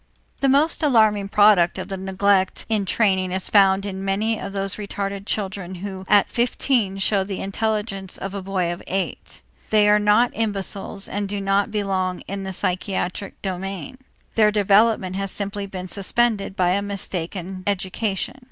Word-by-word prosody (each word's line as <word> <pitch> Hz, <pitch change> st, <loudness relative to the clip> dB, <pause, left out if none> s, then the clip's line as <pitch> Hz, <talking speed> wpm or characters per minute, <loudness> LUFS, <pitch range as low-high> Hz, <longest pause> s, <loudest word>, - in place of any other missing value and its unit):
The 275 Hz, -, +2 dB
most 290 Hz, +5 st, +3 dB
alarming 215 Hz, -8 st, +3 dB
product 205 Hz, -4 st, +5 dB
of -, -, -5 dB
the 195 Hz, -, -4 dB
neglect 190 Hz, 0 st, +1 dB
in 215 Hz, -3 st, +1 dB
training 190 Hz, -3 st, +2 dB
is 190 Hz, 0 st, 0 dB
found 195 Hz, -1 st, +4 dB
in 190 Hz, -1 st, -5 dB
many 210 Hz, +3 st, 0 dB
of 200 Hz, -, -5 dB
those 195 Hz, 0 st, -3 dB
retarded 200 Hz, -1 st, -4 dB
children 190 Hz, -3 st, -3 dB
who 190 Hz, 0 st, -7 dB
at 205 Hz, -1 st, +5 dB
fifteen 235 Hz, -4 st, 0 dB
show 195 Hz, 0 st, +1 dB
the 190 Hz, -1 st, -5 dB
intelligence 205 Hz, -1 st, -2 dB
of 195 Hz, 0 st, -5 dB
a 200 Hz, -, -4 dB
boy 185 Hz, -2 st, -1 dB
of 175 Hz, -, -9 dB
eight. 195 Hz, 0 st, -4 dB, 0.3 s
They 210 Hz, -1 st, +4 dB
are 210 Hz, 0 st, +5 dB
not 210 Hz, +4 st, +4 dB
imbeciles 200 Hz, -2 st, -2 dB
and 205 Hz, 0 st, -3 dB
do 205 Hz, 0 st, -2 dB
not 195 Hz, +1 st, +1 dB
belong 190 Hz, -3 st, -1 dB
in 200 Hz, 0 st, -6 dB
the 190 Hz, 0 st, -4 dB
psychiatric 185 Hz, +1 st, -3 dB
domain; 195 Hz, +6 st, -5 dB, 0.3 s
their 215 Hz, -2 st, +5 dB
development 205 Hz, -2 st, +3 dB
has 195 Hz, 0 st, -2 dB
simply 200 Hz, 0 st, -4 dB
been 185 Hz, -1 st, -6 dB
suspended 200 Hz, +1 st, 0 dB
by 180 Hz, -2 st, +2 dB
a 200 Hz, +2 st, +1 dB
mistaken 185 Hz, -2 st, -4 dB
education. 200 Hz, +4 st, -2 dB
195 Hz, 160 wpm, -22 LUFS, 190-210 Hz, 0.3 s, product